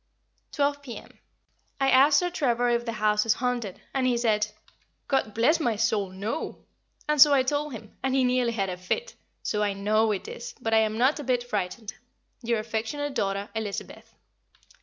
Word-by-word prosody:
Twelve 285 Hz, -1 st, 0 dB
p.m. 255 Hz, -5 st, -10 dB, 0.6 s
I 270 Hz, 0 st, +3 dB
asked 280 Hz, +3 st, +6 dB
Sir 355 Hz, +2 st, +1 dB
Trevor 245 Hz, -6 st, +1 dB
if 240 Hz, 0 st, +1 dB
the 230 Hz, -, -1 dB
house 210 Hz, -1 st, +2 dB
is 225 Hz, -, +3 dB
haunted, 240 Hz, -6 st, -2 dB
and 265 Hz, -2 st, +1 dB
he 245 Hz, -1 st, +2 dB
said, 215 Hz, -3 st, +2 dB, 0.6 s
"God 245 Hz, -6 st, 0 dB
bless 260 Hz, +9 st, +3 dB
my 240 Hz, -8 st, +1 dB
soul, 210 Hz, -3 st, 0 dB
no!" 205 Hz, +11 st, -5 dB, 0.4 s
and 300 Hz, -2 st, +3 dB
so 290 Hz, 0 st, +9 dB
I 265 Hz, -, +4 dB
told 290 Hz, +2 st, -1 dB
him, 220 Hz, -2 st, -10 dB
and 265 Hz, 0 st, 0 dB
he 265 Hz, -, +3 dB
nearly 250 Hz, -1 st, +2 dB
had 195 Hz, -4 st, -1 dB
a 180 Hz, -, -5 dB
fit; 470 Hz, -, -3 dB, 0.3 s
so 210 Hz, -, -1 dB
I 205 Hz, -1 st, +1 dB
know 215 Hz, +2 st, +2 dB
it 200 Hz, -, -3 dB
is, 485 Hz, 0 st, -8 dB
but 225 Hz, -, -2 dB
I 220 Hz, -, +6 dB
am 220 Hz, 0 st, 0 dB
not 260 Hz, +6 st, +3 dB
a -, -, -5 dB
bit 250 Hz, -2 st, 0 dB
frightened. 215 Hz, -1 st, -4 dB, 0.5 s
Your 235 Hz, 0 st, 0 dB
affectionate 230 Hz, +7 st, -3 dB
daughter, 200 Hz, -3 st, -2 dB
Elizabeth. 220 Hz, -3 st, -6 dB
235 Hz, 185 wpm, -26 LUFS, 215-270 Hz, 0.6 s, so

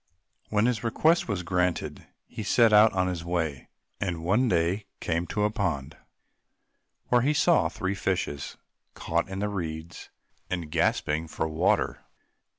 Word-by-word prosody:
When 105 Hz, +1 st, +2 dB
his 120 Hz, -3 st, 0 dB
request 155 Hz, +9 st, +2 dB
was 100 Hz, -5 st, -2 dB
granted 90 Hz, 0 st, -1 dB, 0.2 s
he -, -, -8 dB
set 110 Hz, +2 st, +4 dB
out 105 Hz, +1 st, +7 dB
on 90 Hz, -1 st, +1 dB
his 90 Hz, -3 st, -3 dB
way, 80 Hz, -6 st, -2 dB, 0.3 s
and 85 Hz, -4 st, -3 dB
one 110 Hz, +9 st, +2 dB
day 90 Hz, +4 st, 0 dB
came 85 Hz, +1 st, -1 dB
to 105 Hz, -, -1 dB
a 105 Hz, -, +2 dB
pond, 80 Hz, -, -2 dB, 1.1 s
where 120 Hz, -1 st, +4 dB
he 145 Hz, +4 st, +1 dB
saw 170 Hz, +3 st, +4 dB
three 100 Hz, -3 st, -3 dB
fishes 90 Hz, -7 st, -2 dB, 0.4 s
caught 85 Hz, +2 st, -1 dB
in 95 Hz, -, -5 dB
the 105 Hz, +1 st, -1 dB
reeds 85 Hz, -4 st, -5 dB, 0.4 s
and 85 Hz, -4 st, -4 dB
gasping 80 Hz, -1 st, 0 dB
for 80 Hz, 0 st, -2 dB
water. 80 Hz, 0 st, 0 dB
90 Hz, 150 wpm, -27 LUFS, 85-105 Hz, 1.1 s, out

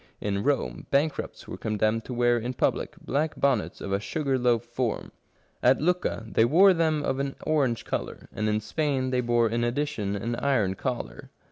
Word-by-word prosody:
In 100 Hz, -1 st, -1 dB
Rome, 140 Hz, -1 st, -1 dB
bankrupts 145 Hz, +2 st, -1 dB
were -, -, -6 dB
condemned 110 Hz, +1 st, 0 dB
to 125 Hz, -, -5 dB
wear 120 Hz, 0 st, +3 dB
in 125 Hz, +3 st, -4 dB
public -, -, 0 dB
black 150 Hz, +3 st, -2 dB
bonnets 135 Hz, -6 st, +1 dB
of 100 Hz, -, -5 dB
a 100 Hz, -, +2 dB
sugar 135 Hz, +3 st, -1 dB
loaf 120 Hz, -2 st, +2 dB
form. 120 Hz, -1 st, -3 dB, 0.5 s
At 130 Hz, +2 st, +4 dB
Lucca 175 Hz, -7 st, 0 dB
they 110 Hz, -, +3 dB
wore 185 Hz, +11 st, +6 dB
them 160 Hz, -3 st, +1 dB
of 135 Hz, -1 st, -1 dB
an 140 Hz, 0 st, -2 dB
orang^e 135 Hz, -7 st, +1 dB
colour; -, -, -4 dB
and 105 Hz, +1 st, -1 dB
in 105 Hz, 0 st, +1 dB
Spain 130 Hz, +2 st, -1 dB
they 125 Hz, -1 st, +2 dB
bore 120 Hz, -1 st, +2 dB
in 115 Hz, +2 st, -1 dB
addition 120 Hz, -5 st, -1 dB
an 115 Hz, +4 st, -3 dB
iron 115 Hz, -10 st, +1 dB
collar. 125 Hz, +5 st, -5 dB
125 Hz, 180 wpm, -27 LUFS, 115-140 Hz, 0.5 s, wore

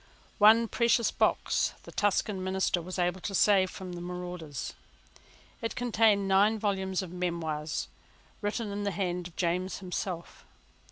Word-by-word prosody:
One 220 Hz, +2 st, +7 dB
precious 235 Hz, 0 st, +2 dB
box -, -, +1 dB
the -, -, -11 dB
Tuscan 205 Hz, -1 st, 0 dB
minister 190 Hz, -1 st, 0 dB
was 185 Hz, +3 st, -6 dB
able 180 Hz, +1 st, 0 dB
to 195 Hz, -, -3 dB
save 190 Hz, -1 st, +4 dB
from 185 Hz, -1 st, -8 dB
the 175 Hz, -, -6 dB
marauders. 175 Hz, -5 st, -5 dB, 0.9 s
It 230 Hz, -, -3 dB
contained 220 Hz, -4 st, +3 dB
nine 200 Hz, +3 st, +4 dB
volumes 190 Hz, -2 st, -1 dB
of 180 Hz, -, -8 dB
memoirs, 160 Hz, -4 st, -2 dB, 0.5 s
written 205 Hz, +1 st, -2 dB
in 200 Hz, +1 st, -3 dB
the 205 Hz, -, 0 dB
hand 180 Hz, -2 st, -2 dB
of 175 Hz, -, -18 dB
James 180 Hz, +2 st, -1 dB
himself. 180 Hz, -2 st, -5 dB
190 Hz, 145 wpm, -29 LUFS, 175-205 Hz, 0.9 s, One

